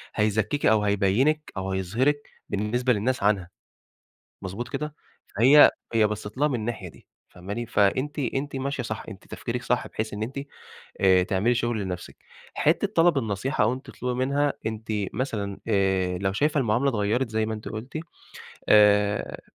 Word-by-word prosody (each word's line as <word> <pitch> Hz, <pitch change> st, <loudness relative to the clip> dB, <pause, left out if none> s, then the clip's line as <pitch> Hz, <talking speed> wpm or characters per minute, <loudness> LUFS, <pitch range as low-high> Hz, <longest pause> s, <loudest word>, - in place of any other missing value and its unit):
هيزكّيكِ 110 Hz, +7 st, 0 dB
أو 110 Hz, -1 st, +4 dB
هيبيّنِك 105 Hz, +10 st, +1 dB
أو 95 Hz, 0 st, -3 dB
هيظهرِك 120 Hz, +11 st, 0 dB, 0.2 s
بالنسبة 120 Hz, +5 st, +1 dB
للناس 115 Hz, +2 st, -1 dB
عنها، 100 Hz, -4 st, +1 dB, 0.9 s
مضبوط 100 Hz, +6 st, -5 dB
كده؟ 150 Hz, +3 st, -4 dB, 0.4 s
فهي 135 Hz, +6 st, +8 dB, 0.2 s
هي 110 Hz, -2 st, +4 dB
بصَّت 105 Hz, +1 st, -6 dB
لها 150 Hz, -, +3 dB
من 140 Hz, -, -1 dB
الناحية 110 Hz, -4 st, -4 dB
دي -, -, -20 dB, 0.2 s
فاهماني؟ 100 Hz, +7 st, -6 dB
فأنتِ 130 Hz, +10 st, +1 dB
أنتِ 135 Hz, +2 st, -2 dB
ماشية 135 Hz, -1 st, -2 dB
صح، 110 Hz, -1 st, -5 dB
أنتِ 95 Hz, -3 st, -12 dB
تفكيرِك -, -, -4 dB
صح -, -, 0 dB
بحيث 110 Hz, -1 st, -4 dB
إن 105 Hz, +1 st, -3 dB
أنتِ 135 Hz, +5 st, -5 dB, 0.6 s
آآ 95 Hz, -1 st, +5 dB
تعملي 100 Hz, +6 st, +1 dB
شُغل 120 Hz, -2 st, -1 dB
لنفسِك. 90 Hz, -2 st, -6 dB, 0.4 s
حتّة 165 Hz, +7 st, +2 dB
طلب 165 Hz, -3 st, +4 dB
النصيحة 110 Hz, +2 st, 0 dB
أو 110 Hz, +3 st, +2 dB
أنتِ 130 Hz, +2 st, -8 dB
تطلُبي 125 Hz, 0 st, -3 dB
منها، 140 Hz, +1 st, +1 dB
أنتِ 110 Hz, 0 st, -4 dB, 0.3 s
مثلًا 105 Hz, -7 st, -3 dB
آآ 95 Hz, -3 st, +1 dB
لو 95 Hz, 0 st, -1 dB
شايفة 150 Hz, +6 st, +1 dB
المعاملة 125 Hz, +3 st, +2 dB
اتغيّرت 115 Hz, +2 st, 0 dB
زي 110 Hz, 0 st, 0 dB
ما 110 Hz, -, -3 dB
أنتِ 110 Hz, 0 st, -7 dB
قلُتِ، 115 Hz, +7 st, -6 dB, 0.7 s
آآ 105 Hz, -1 st, +4 dB
110 Hz, 155 wpm, -25 LUFS, 100-130 Hz, 0.9 s, فهي